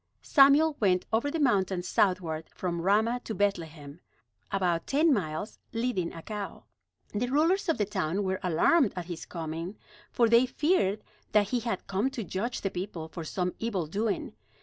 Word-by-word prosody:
Samuel 290 Hz, +2 st, +5 dB
went 185 Hz, -4 st, +2 dB
over 235 Hz, +6 st, +2 dB
the 325 Hz, -, -2 dB
mountains 190 Hz, -9 st, +1 dB
southward 175 Hz, -5 st, 0 dB
from 170 Hz, -2 st, -2 dB
Ramah 220 Hz, +6 st, +2 dB
to 220 Hz, -, -5 dB
Bethlehem, 165 Hz, -6 st, -2 dB, 0.5 s
about 180 Hz, -4 st, 0 dB
ten 300 Hz, +2 st, +4 dB
miles, 175 Hz, -2 st, -3 dB
leading 230 Hz, -7 st, -1 dB
a 165 Hz, -, -10 dB
cow. 210 Hz, -2 st, -6 dB, 0.5 s
The 220 Hz, +4 st, 0 dB
rulers 335 Hz, +8 st, +2 dB
of 325 Hz, -, +2 dB
the 210 Hz, -, +1 dB
town 190 Hz, -1 st, -1 dB
were 190 Hz, -1 st, -1 dB
alarmed 195 Hz, -, +3 dB
at 180 Hz, -2 st, -4 dB
his 170 Hz, -2 st, -7 dB
coming, 165 Hz, +3 st, -5 dB, 0.3 s
for 235 Hz, -, +3 dB
they 235 Hz, +3 st, +5 dB
feared 250 Hz, -, +1 dB, 0.3 s
that 205 Hz, -1 st, +4 dB
he 250 Hz, -, +1 dB
had 230 Hz, -5 st, -3 dB
come 195 Hz, +6 st, 0 dB
to 245 Hz, -4 st, -5 dB
judge 205 Hz, +7 st, -3 dB
the 195 Hz, -, -2 dB
people 175 Hz, -3 st, -5 dB
for 165 Hz, 0 st, -6 dB
some 180 Hz, +3 st, -2 dB
evil 205 Hz, -7 st, -1 dB
doing. 205 Hz, +7 st, -2 dB
200 Hz, 170 wpm, -29 LUFS, 175-235 Hz, 0.5 s, Samuel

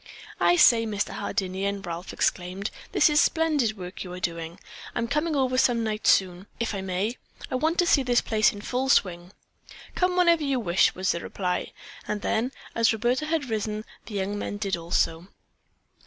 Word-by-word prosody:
"I 350 Hz, -, +4 dB
say, 230 Hz, -9 st, +5 dB
Mr. 205 Hz, -1 st, -2 dB
Hardinian," 195 Hz, +1 st, -3 dB
Ralph 170 Hz, +2 st, -6 dB
exclaimed, 185 Hz, +3 st, -1 dB, 0.2 s
"this -, -, +4 dB
is 300 Hz, -1 st, +3 dB
a -, -, +7 dB
splendid 295 Hz, -10 st, +1 dB
work 180 Hz, 0 st, -8 dB
that -, -, -4 dB
you 180 Hz, -, -9 dB
are 180 Hz, -, -6 dB
doing! 165 Hz, -1 st, -4 dB, 0.4 s
I'm 235 Hz, 0 st, -1 dB
coming 300 Hz, +4 st, 0 dB
over 255 Hz, -2 st, +1 dB
some 235 Hz, -3 st, +3 dB
night 215 Hz, -1 st, -2 dB
soon, 185 Hz, 0 st, +2 dB
if 235 Hz, -2 st, -1 dB
I 195 Hz, -, -3 dB
may. 190 Hz, +5 st, -2 dB, 0.3 s
I -, -, -3 dB
want 320 Hz, +5 st, 0 dB
to 355 Hz, -, +4 dB
see 290 Hz, -, +4 dB
the 245 Hz, -2 st, -1 dB
place 215 Hz, -2 st, +3 dB
in 205 Hz, -, -9 dB
full 255 Hz, +4 st, -2 dB
swing." 175 Hz, -7 st, +2 dB, 0.6 s
"Come 360 Hz, 0 st, +1 dB
whenever 340 Hz, -3 st, +4 dB
you 275 Hz, -3 st, 0 dB
wish," 180 Hz, -5 st, +2 dB
was 185 Hz, 0 st, 0 dB
the 170 Hz, -, -2 dB
reply. 180 Hz, 0 st, -3 dB, 0.4 s
And 210 Hz, -1 st, -3 dB
then, 235 Hz, +4 st, 0 dB, 0.2 s
as 230 Hz, -1 st, +3 dB
Roberta 240 Hz, +7 st, 0 dB
had 310 Hz, -6 st, -1 dB
risen, 215 Hz, 0 st, -2 dB, 0.2 s
the 215 Hz, -, -7 dB
young 200 Hz, +1 st, -2 dB
men 205 Hz, -, -4 dB
did 200 Hz, -3 st, -1 dB
also. 165 Hz, 0 st, -1 dB
215 Hz, 190 wpm, -26 LUFS, 185-260 Hz, 0.6 s, a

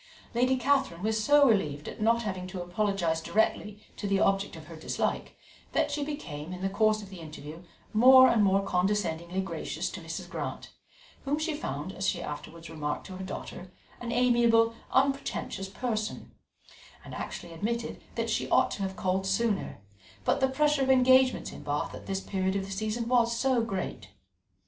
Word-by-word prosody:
Lady 250 Hz, +2 st, +3 dB
Catherine 260 Hz, -9 st, +1 dB
was 220 Hz, 0 st, 0 dB
so 290 Hz, +1 st, +6 dB
relieved 150 Hz, -, +1 dB
at -, -, -7 dB
not 230 Hz, +2 st, +3 dB
having 185 Hz, -3 st, -4 dB
to 185 Hz, 0 st, -6 dB
apologize 175 Hz, -3 st, 0 dB
directly 210 Hz, +2 st, 0 dB
to 205 Hz, -, -3 dB
the 195 Hz, -1 st, +2 dB
object 195 Hz, -1 st, +1 dB
of 160 Hz, -1 st, -10 dB
her 165 Hz, +1 st, -10 dB
dislike, 155 Hz, -, -2 dB, 0.4 s
that -, -, +1 dB
she 290 Hz, 0 st, -1 dB
became, 170 Hz, -, -6 dB
in 185 Hz, 0 st, -6 dB
the 195 Hz, -, 0 dB
course 215 Hz, +1 st, +2 dB
of 195 Hz, -, -11 dB
the 190 Hz, -2 st, -10 dB
interview, 155 Hz, 0 st, -9 dB, 0.3 s
more 260 Hz, +4 st, +8 dB
and 220 Hz, -4 st, +4 dB
more 195 Hz, 0 st, +3 dB
condescendingly 180 Hz, -2 st, 0 dB
gracious 170 Hz, -4 st, -4 dB
to -, -, -7 dB
Mrs. -, -, -6 dB
Grant, -, -, -5 dB, 0.5 s
whom 280 Hz, +2 st, 0 dB
she 310 Hz, +1 st, -1 dB
found, 150 Hz, -, -4 dB
as 190 Hz, 0 st, -2 dB
she 175 Hz, -, -2 dB
afterwards 165 Hz, +1 st, -7 dB
remarked 150 Hz, -2 st, -4 dB
to 185 Hz, -, -8 dB
her 190 Hz, -, -6 dB
daughter, 185 Hz, -1 st, -7 dB, 0.3 s
an 240 Hz, -1 st, -4 dB
amiable, 235 Hz, -2 st, +4 dB, 0.2 s
unpretentious 270 Hz, -7 st, 0 dB
person; 215 Hz, 0 st, -3 dB, 0.7 s
and -, -, -9 dB
actually 170 Hz, -, -6 dB
admitted 230 Hz, +7 st, -3 dB
that -, -, -1 dB
she -, -, -1 dB
ought -, -, +4 dB
to -, -, -5 dB
have 190 Hz, -1 st, -2 dB
called 190 Hz, -2 st, -1 dB
sooner, 200 Hz, -, 0 dB, 0.4 s
but -, -, +2 dB
the 265 Hz, -1 st, +3 dB
pressure 295 Hz, +1 st, +2 dB
of 265 Hz, -, +1 dB
engagements 260 Hz, 0 st, +4 dB
in -, -, -10 dB
Bath 145 Hz, 0 st, -2 dB
at -, -, -10 dB
this 195 Hz, 0 st, -2 dB
period 190 Hz, -1 st, -1 dB
of 195 Hz, -1 st, -1 dB
the 195 Hz, -, -9 dB
season 215 Hz, +4 st, -2 dB
was 235 Hz, -1 st, +3 dB
so 260 Hz, -1 st, +2 dB
great. 190 Hz, -, -4 dB
205 Hz, 180 wpm, -29 LUFS, 185-240 Hz, 0.7 s, more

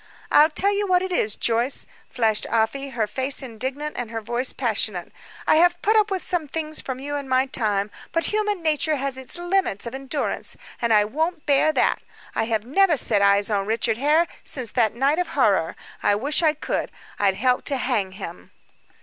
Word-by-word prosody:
"I'll 300 Hz, +1 st, +6 dB
tell 395 Hz, +6 st, +2 dB
you 410 Hz, 0 st, -1 dB
what 365 Hz, -1 st, +3 dB
it 375 Hz, -, -4 dB
is, 220 Hz, -, +1 dB
Joyce," 235 Hz, +3 st, +1 dB, 0.2 s
flashed 225 Hz, -4 st, 0 dB
Afy, 230 Hz, +5 st, 0 dB
her 220 Hz, -, +2 dB
face 260 Hz, +6 st, -1 dB
indignant 265 Hz, +5 st, -5 dB
and 240 Hz, -3 st, -4 dB
her 225 Hz, 0 st, -4 dB
voice 240 Hz, +4 st, 0 dB
passionate, 215 Hz, -7 st, -2 dB, 0.3 s
"I -, -, +4 dB
have 350 Hz, +1 st, +4 dB
put 435 Hz, +2 st, +3 dB
up 430 Hz, -1 st, +4 dB
with 380 Hz, -2 st, -2 dB
some 345 Hz, -4 st, -1 dB
things 310 Hz, +1 st, -1 dB
from 260 Hz, -2 st, -5 dB
you 285 Hz, +2 st, -5 dB
in 280 Hz, -2 st, -7 dB
my 260 Hz, +1 st, +3 dB
time, 210 Hz, -6 st, -1 dB, 0.2 s
but 330 Hz, -, 0 dB
human 420 Hz, -4 st, 0 dB
nature 310 Hz, 0 st, +2 dB
has 275 Hz, -1 st, -2 dB
its 260 Hz, +6 st, -2 dB
limits 350 Hz, -, -1 dB
of 235 Hz, -, -6 dB
endurance, 270 Hz, +2 st, -3 dB, 0.2 s
and 235 Hz, -1 st, +1 dB
I 210 Hz, -1 st, +5 dB
won't 315 Hz, +8 st, -2 dB
bear 290 Hz, +1 st, +3 dB
that. -, -, +1 dB, 0.3 s
I 225 Hz, -, 0 dB
have 220 Hz, -1 st, -1 dB
never 330 Hz, +5 st, +3 dB
set 210 Hz, -5 st, +2 dB
eyes 200 Hz, +1 st, +4 dB
on 200 Hz, -1 st, 0 dB
Richard 225 Hz, 0 st, 0 dB
Hare 300 Hz, +6 st, +3 dB, 0.2 s
since 250 Hz, -5 st, -1 dB
that 225 Hz, -3 st, +1 dB
night 275 Hz, +6 st, +1 dB
of 360 Hz, -, 0 dB
horror; 195 Hz, -10 st, +2 dB, 0.3 s
I 205 Hz, -, +3 dB
wish 285 Hz, +10 st, +1 dB
I 310 Hz, -2 st, +3 dB
could; 300 Hz, -, -3 dB, 0.3 s
I'd 195 Hz, -2 st, +2 dB
help 250 Hz, +4 st, +1 dB
to 280 Hz, -, 0 dB
hang 220 Hz, -8 st, -1 dB
him." 190 Hz, -, -9 dB
265 Hz, 200 wpm, -23 LUFS, 225-310 Hz, 0.3 s, I'll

